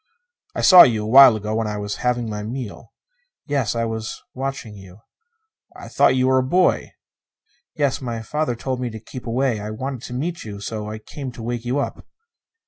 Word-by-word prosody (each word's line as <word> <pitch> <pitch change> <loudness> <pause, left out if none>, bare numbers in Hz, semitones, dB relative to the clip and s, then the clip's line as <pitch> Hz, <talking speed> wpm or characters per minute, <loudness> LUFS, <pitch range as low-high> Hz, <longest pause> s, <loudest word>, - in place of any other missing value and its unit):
"I - - -2
saw 185 -2 +9
you 110 -3 +5
a - - -4
while 130 0 +8
ago, 105 0 -4
when 110 0 -1
I 105 0 -3
was 105 0 -4
having 120 -1 -1
my 105 -1 -4
meal." 115 +1 -7 0.5
"Yes 135 -7 -1
I 115 0 0
was 110 -1 -5
watching 130 -5 -5
you." 95 0 -14 0.7
"I - - -10
thought - - +3
you 130 0 +2
were 130 0 +4
a - - +1
boy." 180 +8 +1 0.8
"Yes. 140 -3 0
My 115 -3 -4
father 150 0 -2
told 125 +1 -4
me 125 - -2
to 110 -1 -8
keep 120 +3 -10
away. 120 -1 0
I 105 +1 -6
wanted 130 +3 -5
to 125 - -8
meet 165 +7 -3
you, 105 -2 -8
so 105 +1 -5
I 110 - -5
came 130 +4 -8
to 115 - -9
wake 120 0 -4
you 125 +3 -1
up." 140 - -3
120 Hz, 205 wpm, -21 LUFS, 110-130 Hz, 0.8 s, saw